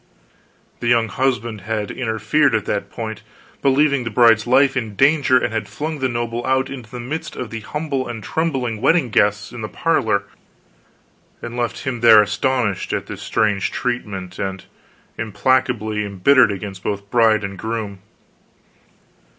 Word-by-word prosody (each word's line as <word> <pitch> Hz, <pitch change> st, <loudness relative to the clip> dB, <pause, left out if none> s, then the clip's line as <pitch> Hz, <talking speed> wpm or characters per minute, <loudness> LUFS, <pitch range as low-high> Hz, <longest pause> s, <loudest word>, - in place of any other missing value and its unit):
The 120 Hz, -, -3 dB
young 115 Hz, -2 st, +3 dB
husband 120 Hz, -4 st, -1 dB
had 105 Hz, +1 st, -3 dB
interfered 115 Hz, +4 st, +1 dB
at 110 Hz, -, -1 dB
that 100 Hz, -, -2 dB
point, 110 Hz, -2 st, -6 dB, 0.4 s
believing 140 Hz, 0 st, +3 dB
the 115 Hz, -, -3 dB
bride's 115 Hz, -1 st, +4 dB
life 135 Hz, +2 st, +4 dB
in 110 Hz, -5 st, -3 dB
danger, 135 Hz, +1 st, +4 dB
and 120 Hz, -, -1 dB
had 110 Hz, -2 st, -2 dB
flung 150 Hz, +8 st, -4 dB
the 130 Hz, -1 st, 0 dB
noble 120 Hz, 0 st, -3 dB
out 130 Hz, +1 st, 0 dB
into 125 Hz, -5 st, -8 dB
the 125 Hz, -, -7 dB
midst 155 Hz, +7 st, -5 dB
of 125 Hz, -, -6 dB
the 115 Hz, -, -4 dB
humble 140 Hz, +3 st, -3 dB
and 115 Hz, -3 st, -6 dB
trembling 130 Hz, -9 st, -2 dB
wedding 160 Hz, -7 st, +3 dB
guests, 105 Hz, 0 st, +1 dB
in 120 Hz, -, -8 dB
the 110 Hz, -, -4 dB
parlor, 110 Hz, -11 st, +1 dB, 1.2 s
and 120 Hz, 0 st, -7 dB
left 120 Hz, -1 st, -3 dB
him 125 Hz, -2 st, -3 dB
there 115 Hz, -2 st, +8 dB
astonished 105 Hz, 0 st, -1 dB
at -, -, -2 dB
this -, -, -8 dB
strange 105 Hz, -2 st, 0 dB
treatment, 105 Hz, -7 st, -4 dB
and 95 Hz, -1 st, -4 dB, 0.5 s
implacably 110 Hz, -1 st, 0 dB
embittered 100 Hz, +6 st, +4 dB
against 95 Hz, -1 st, -6 dB
both 100 Hz, 0 st, -4 dB
bride 110 Hz, -3 st, +4 dB
and 100 Hz, -1 st, -6 dB
groom. 110 Hz, -3 st, -4 dB
115 Hz, 155 wpm, -20 LUFS, 105-130 Hz, 1.2 s, there